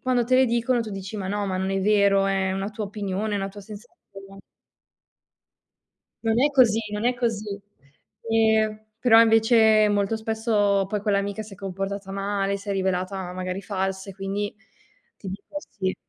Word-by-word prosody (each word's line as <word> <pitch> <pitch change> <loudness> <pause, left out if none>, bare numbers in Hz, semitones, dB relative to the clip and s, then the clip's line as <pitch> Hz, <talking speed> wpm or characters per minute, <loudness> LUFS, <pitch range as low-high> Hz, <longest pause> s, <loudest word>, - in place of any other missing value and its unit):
quando 250 -2 +1
te 255 +2 +3
le 260 0 +5
dicono 235 +1 +1
tu 225 -2 -5
dici: 195 +1 -6
"Ma 195 -2 -4
no, 205 0 -1
ma 185 -1 -2
non 190 +1 -1
è 195 - 0
vero, 200 -1 +3
è 195 -1 0
una 195 +2 -3
tua 215 0 -5
opinione, 205 +1 -3
è - - +1
una 195 0 -2
tua 205 +1 -11
sensazione". 195 -2 -13 1.8
Non 225 +1 +1
è 295 - +4
così, 245 -6 +4
non 210 +2 -3
è 250 +1 +2
così. 215 -4 -3 0.7
Ehm, 220 -1 +2 0.2
però 225 -1 +6
invece 220 -1 +5
molto 205 +1 +1
spesso 220 -3 +1
poi 210 +1 -2
quell'amica 200 0 -1
si 215 - -13
è 195 - -10
comportata 195 0 -5
male, 200 0 -1
si 200 +1 -11
è - - +1
rivelata 190 -1 -2
magari 185 +1 -4
falsa 190 0 -3
e - - -12
quindi 195 +2 -3 0.6
ti 195 - -9
dico: 200 +10 -8
"Sì", 195 -10 -4
205 Hz, 175 wpm, -24 LUFS, 195-220 Hz, 1.8 s, però